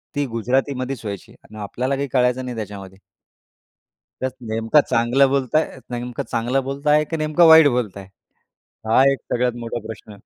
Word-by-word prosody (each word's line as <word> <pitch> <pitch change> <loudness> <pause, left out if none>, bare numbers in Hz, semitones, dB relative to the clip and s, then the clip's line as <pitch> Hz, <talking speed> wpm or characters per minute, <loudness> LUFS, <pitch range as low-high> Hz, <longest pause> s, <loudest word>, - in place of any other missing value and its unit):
ती 145 0 0
गुजरातीमध्येच 130 +2 -2
व्हायची. 100 -2 -7
आणि 110 - -14
आपल्याला 125 +7 -2
काही 140 +1 -3
कळायचं 125 0 +1
नाही 125 -2 -5
त्याच्यामध्ये. 100 -3 -8 1.2
त्यात 130 - -1 0.2
नेमकं 115 +7 +3
चांगलं 120 +4 +3
बोलत 135 0 -1
आहेत 155 -4 0
नेमकं 120 0 -5
चांगलं 125 +4 0
बोलत 140 +3 -6
आहेत, 150 +1 +4
की 165 - -1
नेमकं 155 +2 +3
वाईट 160 -1 +8
बोलत 120 -7 -1
आहेत? 95 -1 -11 0.8
हा 115 +4 +4
एक 135 - -1 0.2
सगळ्यात 125 0 +1
मोठा 120 0 -5
प्रश्न 110 -1 -10
125 Hz, 165 wpm, -21 LUFS, 115-140 Hz, 1.2 s, वाईट